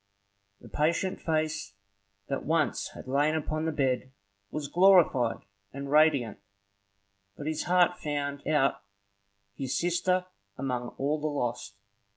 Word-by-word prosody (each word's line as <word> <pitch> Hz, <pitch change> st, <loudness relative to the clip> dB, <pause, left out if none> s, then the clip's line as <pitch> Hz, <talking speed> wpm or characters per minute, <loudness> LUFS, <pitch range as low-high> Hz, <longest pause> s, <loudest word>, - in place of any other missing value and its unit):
The -, -, -12 dB
patient 170 Hz, +5 st, 0 dB
face 155 Hz, -11 st, -1 dB, 0.5 s
that 135 Hz, -, -3 dB
once 155 Hz, -1 st, 0 dB
had -, -, -9 dB
lain 145 Hz, +4 st, +2 dB
upon 155 Hz, 0 st, -2 dB
the 160 Hz, -, 0 dB
bed 130 Hz, -3 st, 0 dB, 0.4 s
was 150 Hz, -2 st, -4 dB
glorified 175 Hz, -10 st, +4 dB, 0.3 s
and 140 Hz, +1 st, -6 dB
radiant, 145 Hz, -7 st, +3 dB, 1.0 s
but 145 Hz, -, -7 dB
his 155 Hz, 0 st, -2 dB
heart 180 Hz, 0 st, +3 dB
found 145 Hz, -1 st, -3 dB
out 145 Hz, -3 st, +2 dB, 0.7 s
his 130 Hz, +2 st, -3 dB
sister 180 Hz, +1 st, +1 dB, 0.3 s
among 125 Hz, -2 st, -3 dB
all 145 Hz, +3 st, -1 dB
the 155 Hz, -, 0 dB
host. 120 Hz, -8 st, -3 dB
150 Hz, 125 wpm, -29 LUFS, 135-160 Hz, 1.0 s, glorified